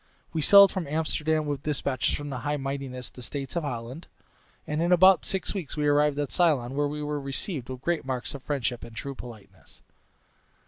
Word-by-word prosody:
We 160 Hz, -, 0 dB
sailed 200 Hz, +4 st, +8 dB
from 180 Hz, -5 st, -3 dB
Amsterdam 155 Hz, 0 st, 0 dB
with 145 Hz, -2 st, -3 dB
despatches 140 Hz, -3 st, -1 dB
from 145 Hz, 0 st, -6 dB
their 130 Hz, -, -4 dB
High 145 Hz, +3 st, -1 dB
Mightinesses 135 Hz, -2 st, -5 dB
the 125 Hz, -, -12 dB
States 135 Hz, +4 st, -5 dB
of 170 Hz, -, +1 dB
Holland, 125 Hz, +3 st, -6 dB, 0.6 s
and 150 Hz, +1 st, -2 dB
in 170 Hz, +1 st, +1 dB
about 185 Hz, +1 st, +6 dB
six 190 Hz, -, -2 dB
weeks 180 Hz, -9 st, -5 dB
we 150 Hz, -, 0 dB
arrived 145 Hz, 0 st, +3 dB
at 145 Hz, -1 st, -2 dB
Ceylon, 145 Hz, -8 st, +2 dB
where 145 Hz, +1 st, +1 dB
we 150 Hz, +1 st, -4 dB
were 150 Hz, -1 st, -3 dB
received 135 Hz, -, -3 dB
with 130 Hz, -1 st, -6 dB
great 170 Hz, +2 st, -1 dB
marks 130 Hz, -2 st, -3 dB
of 140 Hz, -, -7 dB
friendship 125 Hz, -4 st, -2 dB
and 115 Hz, -, -11 dB
true 135 Hz, +4 st, -5 dB
politeness. 120 Hz, -5 st, -13 dB
145 Hz, 195 wpm, -27 LUFS, 130-155 Hz, 0.6 s, sailed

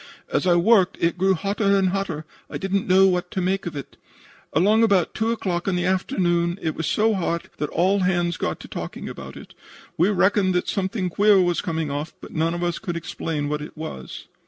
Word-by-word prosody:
As -, -, +1 dB
I 175 Hz, -, +5 dB
worked 190 Hz, +1 st, +4 dB
it 170 Hz, +1 st, +1 dB
grew 190 Hz, +1 st, +2 dB
hotter 200 Hz, +2 st, +1 dB
and 190 Hz, -1 st, +2 dB
hotter. 180 Hz, -5 st, -3 dB, 0.2 s
I -, -, -4 dB
didn't 195 Hz, 0 st, -1 dB
know 190 Hz, +1 st, +6 dB
what 180 Hz, -1 st, +1 dB
to -, -, -3 dB
make 185 Hz, +1 st, -1 dB
of 170 Hz, -, -5 dB
it. 140 Hz, -, -8 dB, 0.5 s
Along 205 Hz, +8 st, +3 dB
about 200 Hz, -6 st, +3 dB
2 225 Hz, +1 st, 0 dB
o'clock 185 Hz, -6 st, -2 dB
in 190 Hz, -, +1 dB
the 180 Hz, 0 st, 0 dB
afternoon 175 Hz, -2 st, +1 dB
it 160 Hz, -4 st, -2 dB
was 160 Hz, -, -3 dB
so 220 Hz, +6 st, +2 dB
hot 170 Hz, -3 st, -2 dB
that 150 Hz, -, -2 dB
all 190 Hz, +4 st, +2 dB
hands 175 Hz, -2 st, +1 dB
got -, -, -3 dB
to -, -, -10 dB
talking -, -, -6 dB
about -, -, -8 dB
it. -, -, -12 dB, 0.5 s
We 175 Hz, +4 st, +4 dB
reckoned 190 Hz, -1 st, +2 dB
that 180 Hz, -, 0 dB
something 190 Hz, -1 st, -1 dB
queer 205 Hz, +2 st, +5 dB
was 175 Hz, -2 st, +2 dB
coming 160 Hz, -3 st, -2 dB
off, 145 Hz, +3 st, -4 dB
but -, -, -11 dB
none 165 Hz, +1 st, 0 dB
of 175 Hz, -, -3 dB
us 175 Hz, -1 st, -1 dB
could 175 Hz, -2 st, -4 dB
explain 155 Hz, -2 st, -3 dB
what 150 Hz, 0 st, -2 dB
it 150 Hz, -, -9 dB
was. 155 Hz, -, -7 dB
180 Hz, 215 wpm, -23 LUFS, 170-195 Hz, 0.5 s, know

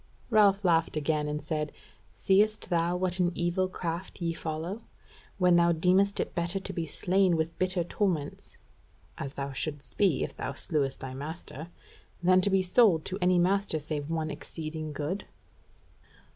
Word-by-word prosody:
Ralph 205 Hz, -2 st, +4 dB
laughed 165 Hz, -2 st, +2 dB
again, 150 Hz, 0 st, 0 dB
and 150 Hz, 0 st, -3 dB
said: 150 Hz, -2 st, -2 dB, 0.4 s
"Seest 210 Hz, +1 st, +2 dB
thou 170 Hz, +1 st, +2 dB
what 185 Hz, 0 st, 0 dB
an 175 Hz, -1 st, +3 dB
evil 175 Hz, +2 st, +1 dB
craft 175 Hz, 0 st, -5 dB
ye 170 Hz, -2 st, -1 dB
follow, 165 Hz, +7 st, -4 dB, 0.6 s
when 180 Hz, -2 st, +5 dB
thou 170 Hz, 0 st, +5 dB
deemest 185 Hz, +4 st, +3 dB
it -, -, -2 dB
better 175 Hz, +3 st, 0 dB
to 190 Hz, -, -6 dB
be 165 Hz, -2 st, -3 dB
slain 180 Hz, +3 st, +2 dB
with 160 Hz, +1 st, -1 dB
bitter 185 Hz, -1 st, +1 dB
torments 170 Hz, -5 st, -2 dB, 0.6 s
(as 140 Hz, +1 st, -5 dB
thou 140 Hz, 0 st, -3 dB
shouldest 145 Hz, +1 st, -5 dB
be 195 Hz, -8 st, +3 dB
if -, -, -5 dB
thou 135 Hz, -, -4 dB
slewest 140 Hz, -1 st, -1 dB
thy 130 Hz, -1 st, -6 dB
master) 155 Hz, +2 st, -7 dB, 0.6 s
than 185 Hz, +1 st, +5 dB
to 200 Hz, -, +2 dB
be 190 Hz, -1 st, +3 dB
sold 185 Hz, -4 st, +4 dB
to 190 Hz, +1 st, -4 dB
any 180 Hz, 0 st, +4 dB
master 185 Hz, -1 st, +2 dB
save 150 Hz, -1 st, -4 dB
one 160 Hz, -1 st, -1 dB
exceeding 155 Hz, 0 st, -6 dB
good?" 150 Hz, +7 st, -3 dB
170 Hz, 160 wpm, -29 LUFS, 155-185 Hz, 0.6 s, when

